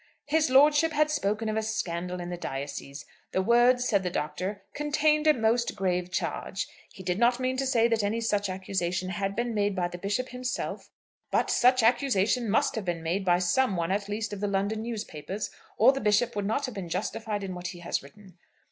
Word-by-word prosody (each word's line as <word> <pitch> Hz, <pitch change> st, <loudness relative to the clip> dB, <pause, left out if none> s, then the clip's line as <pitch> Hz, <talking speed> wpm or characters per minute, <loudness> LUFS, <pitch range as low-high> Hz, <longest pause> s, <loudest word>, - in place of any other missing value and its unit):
"His 305 Hz, 0 st, +2 dB
lordship 295 Hz, +4 st, +5 dB
had 305 Hz, 0 st, +2 dB
spoken 215 Hz, -5 st, -1 dB
of 220 Hz, 0 st, 0 dB
'scandal 180 Hz, -4 st, -3 dB
in 175 Hz, 0 st, -5 dB
the -, -, -2 dB
diocese.' 140 Hz, -2 st, -6 dB, 0.3 s
The 190 Hz, -, +2 dB
words," 245 Hz, +3 st, +4 dB
said 200 Hz, -4 st, +2 dB
the 180 Hz, -, -2 dB
Doctor, 180 Hz, +6 st, -3 dB
"contained 300 Hz, +1 st, +2 dB
a 305 Hz, -, +7 dB
most 230 Hz, +1 st, +1 dB
grave 180 Hz, -1 st, -1 dB
charge. 190 Hz, +1 st, -3 dB, 0.2 s
He 190 Hz, -, -11 dB
did 180 Hz, +2 st, -1 dB
not 240 Hz, +1 st, +3 dB
mean 255 Hz, 0 st, 0 dB
to 270 Hz, 0 st, 0 dB
say 235 Hz, -3 st, +3 dB
that 230 Hz, -2 st, +1 dB
any 205 Hz, +3 st, 0 dB
such 205 Hz, -3 st, 0 dB
accusation 185 Hz, -1 st, -2 dB
had 195 Hz, 0 st, -2 dB
been 235 Hz, +1 st, -1 dB
made 205 Hz, -2 st, +1 dB
by 175 Hz, -2 st, 0 dB
the 175 Hz, -, -8 dB
Bishop 205 Hz, +7 st, -2 dB
himself; 250 Hz, 0 st, -4 dB, 0.4 s
but -, -, +1 dB
such 255 Hz, 0 st, +4 dB
accusation 240 Hz, -1 st, +2 dB
must 215 Hz, -, +2 dB
have 220 Hz, -4 st, -4 dB
been 170 Hz, -2 st, -2 dB
made 175 Hz, +5 st, -1 dB
by 175 Hz, -2 st, +4 dB
some 190 Hz, +5 st, +2 dB
one 170 Hz, +1 st, -1 dB
at 200 Hz, +1 st, -1 dB
least 210 Hz, +1 st, -3 dB
of 205 Hz, -, -5 dB
the 205 Hz, -, -1 dB
London 200 Hz, +2 st, -1 dB
newspapers 210 Hz, -4 st, -5 dB, 0.3 s
or 235 Hz, +5 st, +7 dB
the 270 Hz, -, -4 dB
Bishop 210 Hz, +3 st, +2 dB
would 205 Hz, -1 st, -1 dB
not 250 Hz, +6 st, 0 dB
have 255 Hz, -, -6 dB
been 190 Hz, -4 st, -6 dB
justified 205 Hz, +3 st, -3 dB
in 190 Hz, -1 st, -4 dB
what 180 Hz, 0 st, -5 dB
he 175 Hz, 0 st, -8 dB
has 170 Hz, -, -1 dB
written. 185 Hz, +5 st, -16 dB
205 Hz, 210 wpm, -28 LUFS, 185-240 Hz, 0.4 s, a